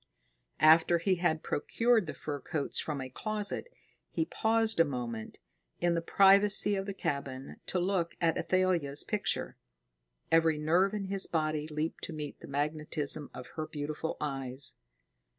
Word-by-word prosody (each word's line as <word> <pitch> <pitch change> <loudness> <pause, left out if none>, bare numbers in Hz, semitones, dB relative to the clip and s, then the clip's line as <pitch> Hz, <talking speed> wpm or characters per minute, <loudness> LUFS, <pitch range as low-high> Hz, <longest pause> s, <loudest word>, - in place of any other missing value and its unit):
After 160 +2 +6
he 185 +2 +1
had 165 -2 0
procured 230 +4 +1
the - - -5
fur 145 -2 -4
coats 145 0 -2
from 150 -3 -3
a 130 - -4
closet, 210 - -3 0.4
he 320 - -1
paused 225 - +1
a - - +8
moment, 120 -6 -5 0.4
in 175 0 +2
the 170 - 0
privacy 200 +3 +5
of 195 0 -2
the 200 - -3
cabin, 135 -5 -4
to - - -1
look 180 -2 0
at 165 -2 +2
Athalia's 175 -7 +1
picture. - - -2 0.7
Every 165 -1 +4
nerve 175 +7 +2
in 200 -2 -3
his 195 0 +3
body 155 -2 -1
leaped 155 +1 -3
to 165 - -7
meet 150 -2 -6
the - - -11
magnetism 150 0 0
of 125 - -9
her 155 -1 -5
beautiful 155 0 -4
eyes. 135 -2 -4
160 Hz, 150 wpm, -31 LUFS, 145-190 Hz, 0.7 s, a